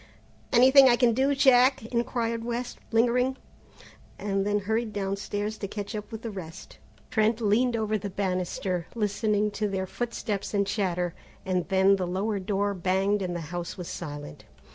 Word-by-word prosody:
"Anything 265 +2 +7
I 240 - +5
can 240 -1 +3
do, 270 +4 +2
Jack?" 260 -2 +5
inquired 230 -1 -1
West, 240 +1 -4
lingering, 250 +3 +2 0.8
and 195 0 -1
then 205 0 +2
hurried 220 +2 -1
downstairs 205 +2 -3
to 200 - -3
catch 205 +2 -6
up 210 +2 -6
with 225 0 -7
the 230 - -4
rest. 175 -5 -9 0.3
Trent 220 -1 +2
leaned 235 +3 +2
over 215 -1 0
the 200 0 -5
banisters, 185 -2 -2
listening 210 -1 0
to 210 +1 -1
their 190 -1 -2
footsteps 210 -1 -3
and 200 0 +2
chatter, 180 -4 -1 0.3
and 185 -2 -1
then 195 0 +4
the 185 -2 -2
lower 200 +3 -1
door 200 +1 -1
banged 190 +2 +1
and 180 -2 -2
the 170 - -3
house 175 +1 -4
was 180 -2 -6
silent. 145 -3 -7
205 Hz, 165 wpm, -27 LUFS, 190-235 Hz, 0.8 s, Anything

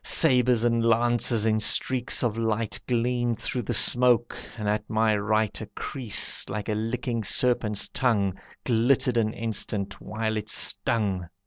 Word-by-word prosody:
Sabres 125 -6 +4
and 115 -1 +1
lances 115 -1 +2
in 110 -1 +1
streaks 125 +4 -1
of 115 -3 0
light 115 -1 -2
Gleamed 120 -1 -1
through 125 - -3
the 110 - -4
smoke, 120 -1 +4 0.2
and 105 -2 -4
at 105 0 -2
my 110 0 +1
right 105 0 -1
A 110 - -7
creese, 105 - +1
like 105 +2 -5
a - - 0
licking 115 +1 -3
serpent's 105 -1 +1
tongue, 105 -7 0 0.3
Glittered 125 +1 +1
an 110 -2 +1
instant, 105 -3 -3
while 110 0 -3
it 105 - -6
stung. 95 -6 0
115 Hz, 145 wpm, -25 LUFS, 105-120 Hz, 0.3 s, Sabres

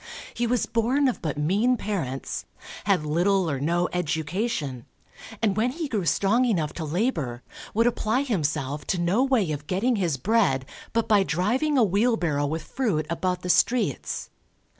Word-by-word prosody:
He 240 - -1
was 245 0 +1
born 250 +5 +1
of 255 - -1
but 150 -3 -3
mean 205 +12 +2
parents, 165 - -3 0.4
had 195 -7 +2
little 180 +4 +2
or 140 -4 -1
no 170 +5 +1
education, 160 - -2 0.6
and 205 -3 +2
when 225 +4 +2
he 315 +4 -4
grew 210 -9 -2
strong 200 - +2
enough 175 -12 0
to 160 - -5
labour, 155 - -1 0.3
would 230 +2 +3
apply 240 +1 +1
himself 145 - -1
to 190 - 0
no 180 +9 +2
way 245 -11 +2
of 150 0 -5
getting 225 +6 +1
his 170 -8 0
bread 160 - +2 0.3
but 230 0 0
by 210 -2 +5
driving 230 - +1
a 250 - +6
wheelbarrow 190 -8 +1
with 160 +2 -3
fruit 200 - -1
about 180 +2 -1
the 180 - -4
streets. 245 +6 0
190 Hz, 160 wpm, -25 LUFS, 155-230 Hz, 0.6 s, a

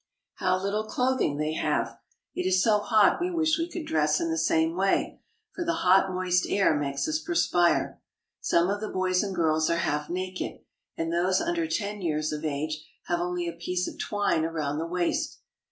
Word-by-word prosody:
How 185 -1 +1
little 200 +3 -1
clothing 250 - 0
they 150 +1 -1
have!. - - -1 0.3
It 180 - -2
is 185 0 +3
so 215 -2 +4
hot 210 +6 +3
we 355 - 0
wish 320 -2 +1
we 335 +1 -1
could 345 -3 -5
dress 150 -1 +2
in 165 - -1
the 160 - -1
same 160 0 +2
way, 195 +1 0 0.3
for 345 - -3
the 335 0 0
hot, 190 +1 +5
moist 180 -1 +1
air 195 -6 +3
makes 140 -1 -1
us 315 0 0
perspire. 175 - +1 0.4
Some 170 +3 +2
of 205 +1 -2
the 215 - -3
boys 185 -1 +1
and 195 -2 -3
girls 160 -2 +2
are 170 - +2
half 150 -3 -1
naked, 185 +1 -4 0.4
and 165 0 -2
those 180 +2 +2
under 335 -1 -1
ten 210 -10 -3
years 155 -3 -1
of 150 0 -4
age 155 +1 -3 0.2
have 175 - -1
only 175 0 -2
a 170 - -3
piece 180 +2 -2
of - - -8
twine 205 -6 0
around 155 -3 -2
the 165 - -3
waist. 175 0 -1
180 Hz, 195 wpm, -27 LUFS, 160-205 Hz, 0.4 s, hot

